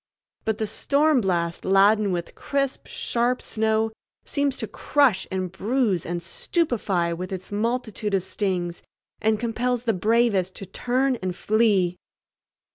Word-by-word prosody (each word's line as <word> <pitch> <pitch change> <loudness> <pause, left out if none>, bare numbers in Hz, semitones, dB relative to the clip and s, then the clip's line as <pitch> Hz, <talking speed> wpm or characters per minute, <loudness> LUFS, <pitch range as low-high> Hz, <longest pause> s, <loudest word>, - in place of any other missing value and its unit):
But 220 -1 0
the 220 - -1
storm 280 +6 +2
blast 170 -3 -1
laden 200 +2 +4
with 175 -1 -3
crisp, 275 -1 -2
sharp 245 +1 0
snow 220 0 0 0.3
seems 280 -2 0
to - - -3
crush 280 -9 +2
and 185 -2 -2
bruise 205 -2 0
and 175 0 -3
stupefy 195 - 0
with 180 +2 -5
its 190 +1 -6
multitude 220 -1 -1
of 190 - +1
stings, 180 -3 -2 0.4
and 220 -1 +2
compels 240 +1 -1
the 230 -2 +1
bravest 210 -2 +2
to 195 - -7
turn 250 +6 0
and 185 -4 -3
flee. 205 -5 +2
215 Hz, 135 wpm, -24 LUFS, 185-240 Hz, 0.4 s, laden